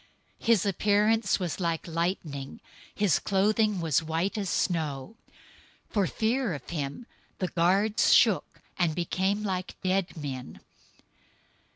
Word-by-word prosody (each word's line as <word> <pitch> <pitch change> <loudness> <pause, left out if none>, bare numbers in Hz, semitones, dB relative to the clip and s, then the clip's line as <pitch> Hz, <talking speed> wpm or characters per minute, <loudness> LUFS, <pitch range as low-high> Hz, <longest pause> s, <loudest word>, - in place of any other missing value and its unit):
028:003 - - -14
His 225 -4 +4
appearance 205 +2 +2
was 180 -2 -3
like 170 -2 -1
lightning, 165 -5 -2
and - - -13 0.4
his 205 -6 +2
clothing 210 +1 +2
white 165 - 0
as 200 -3 -2
snow. 155 +1 -1 0.7
028:004 - - -28
For 200 -4 +2
fear 230 0 0
of 140 - -10
him, 145 - -4 0.3
the 185 - -2
guards 200 +5 +2
shook, 220 -6 +3 0.2
and 170 -4 +2
became 190 +4 0
like 185 -3 -3
dead 185 -1 0
men. 135 -4 -6
185 Hz, 130 wpm, -28 LUFS, 165-205 Hz, 0.7 s, His